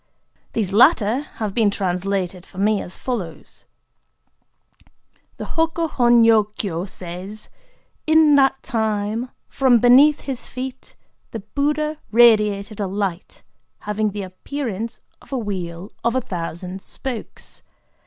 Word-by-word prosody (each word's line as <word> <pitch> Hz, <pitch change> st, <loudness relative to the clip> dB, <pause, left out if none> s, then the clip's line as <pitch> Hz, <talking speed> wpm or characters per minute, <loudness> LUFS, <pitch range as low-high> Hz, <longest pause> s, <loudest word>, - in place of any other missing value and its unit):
These 200 Hz, -4 st, -1 dB
latter 235 Hz, -1 st, +5 dB, 0.2 s
have 215 Hz, -3 st, -3 dB
been 220 Hz, -2 st, +3 dB
translated 185 Hz, -1 st, -2 dB
for 185 Hz, -, -17 dB
me 205 Hz, +1 st, +2 dB
as 180 Hz, -, -8 dB
follows:— 190 Hz, -11 st, -6 dB, 1.7 s
The -, -, -5 dB
HO 325 Hz, 0 st, +1 dB
KO 330 Hz, 0 st, -2 dB
HON 240 Hz, -3 st, +4 dB
NYO 225 Hz, -2 st, +6 dB
KYO 175 Hz, -3 st, -2 dB
says:—"In 215 Hz, -, -1 dB
that 270 Hz, -1 st, +3 dB
time, 220 Hz, 0 st, -1 dB, 0.2 s
from 260 Hz, -3 st, +3 dB
beneath 260 Hz, +6 st, +6 dB
his 265 Hz, -3 st, -5 dB
feet, 260 Hz, +1 st, -7 dB, 0.3 s
the 225 Hz, -, -6 dB
Buddha 300 Hz, +7 st, -1 dB
radiated 215 Hz, -3 st, +4 dB
a 200 Hz, -, -1 dB
light 190 Hz, -2 st, -4 dB, 0.4 s
having 210 Hz, +1 st, -1 dB
the 205 Hz, 0 st, -5 dB
appearance 225 Hz, +3 st, -5 dB, 0.2 s
of -, -, -19 dB
a 270 Hz, -, -1 dB
wheel 185 Hz, -4 st, -5 dB
of 235 Hz, +1 st, +1 dB
a 260 Hz, -, +2 dB
thousand 180 Hz, -2 st, -5 dB
spokes. 250 Hz, +1 st, -6 dB
215 Hz, 125 wpm, -21 LUFS, 195-255 Hz, 1.7 s, NYO